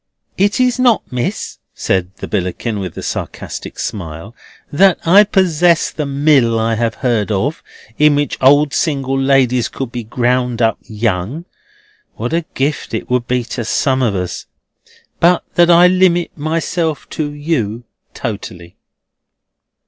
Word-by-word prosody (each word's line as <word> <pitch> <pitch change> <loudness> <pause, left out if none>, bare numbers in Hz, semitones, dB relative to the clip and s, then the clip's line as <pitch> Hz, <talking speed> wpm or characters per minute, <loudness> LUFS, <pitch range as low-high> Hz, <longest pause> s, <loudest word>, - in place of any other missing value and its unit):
"It 200 +4 +1
is 255 0 +2
not, 245 -3 +3
Miss," 125 -1 -3 0.2
said 90 -1 -1
the - - -7
Billickin, 100 +3 -2
with 95 -4 -6
a - - -6
sarcastic - - -6
smile, 90 +1 -6 0.4
"that 190 +5 +4
I 195 +5 +7
possess 175 -4 +2
the 150 -2 -4
Mill 140 -5 +3
I 115 0 0
have 115 0 -1
heard 110 -4 +1
of, 125 +11 -1 0.4
in 150 -1 +5
which 145 -1 -1
old 145 +2 +4
single 135 -4 -1
ladies 135 -3 +2
could 135 -3 -5
be 120 -1 -5
ground 125 +1 0
up 115 -3 +1
young 110 - -3 0.7
(what 120 +7 -4
a 170 -1 0
gift 140 -3 -2
it 110 - -5
would 125 -1 0
be 125 -1 0
to 120 - -3
some 130 +4 0
of 115 -6 +1
us), 90 -2 -4 0.7
but 175 +1 +3
that 175 0 +4
I 175 +1 +7
limit 180 -1 +2
myself 160 +1 -2
to 150 -2 -3
you 135 -7 -2 0.3
totally." 90 -7 -6
130 Hz, 145 wpm, -16 LUFS, 115-160 Hz, 0.7 s, I